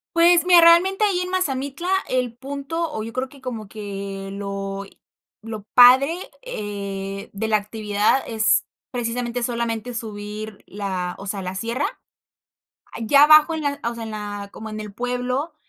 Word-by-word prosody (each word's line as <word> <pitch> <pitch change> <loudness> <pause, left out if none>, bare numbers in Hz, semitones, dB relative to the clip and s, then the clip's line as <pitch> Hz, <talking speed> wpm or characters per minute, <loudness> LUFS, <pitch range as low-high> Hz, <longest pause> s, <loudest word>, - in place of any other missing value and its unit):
Pues, 340 +1 +5
mira, 355 -1 +7
realmente 350 +5 +6
ahí, 395 -4 +2
en 360 0 -2
Mazamitla, 285 -3 -2 0.2
el 250 -2 0
punto, 280 +5 -4
o 220 - -4
yo 225 +1 -7
creo 260 +1 -2
que 280 - -16
como 230 -5 -5
que 195 -2 -6
lo, 195 0 -5
eh, - - -19 0.5
lo 220 -2 -6
padre, 260 +6 +7 0.2
eh, 200 - -5
de 210 +2 -2
la 215 -1 +4
actividad 210 +3 0
es, 220 -2 +2 0.2
precisamente, 240 0 -2
solamente 235 0 -2
subir 215 -1 -7
la, 185 -3 -3
o 195 - -8
sea, 195 0 -3
la 185 0 -4
sierra. 230 +7 -2 1.2
Ya 280 +6 +6
abajo, 305 +2 +7
en 315 - -3
la, 285 -1 -1
o 235 - -6
sea, 230 - -6
en 220 - -6
la 205 -1 -6
como 220 - -8
en 215 0 -6
el 210 -1 -7
pueblo, 250 +6 -2
230 Hz, 165 wpm, -22 LUFS, 205-275 Hz, 1.2 s, mira